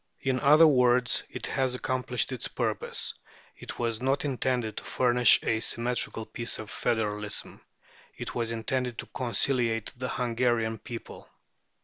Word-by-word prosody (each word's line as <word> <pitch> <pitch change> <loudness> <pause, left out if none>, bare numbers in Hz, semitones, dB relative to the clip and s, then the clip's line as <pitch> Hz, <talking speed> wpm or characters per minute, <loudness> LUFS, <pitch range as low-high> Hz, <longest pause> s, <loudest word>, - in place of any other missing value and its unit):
In 130 -1 0
other 150 +4 +7
words, 125 -4 +4
it - - -6
has 130 -2 0
accomplished 125 0 -2
its 125 - -2
purpose. - - -1 0.4
It - - -9
was 115 -1 -1
not 135 +3 0
intended 125 -5 -1
to - - -4
furnish 125 -1 +5
a 110 - +1
symmetrical 115 -1 0
piece 115 +2 -3
of 110 -1 -8
federalism. 105 -2 -2 0.6
It - - -6
was 115 -1 -2
intended 120 +1 -2
to - - -5
conciliate 120 -3 0
the 130 +1 -4
Hungarian 120 -2 0
people. 115 +2 -9
120 Hz, 135 wpm, -28 LUFS, 115-130 Hz, 0.6 s, other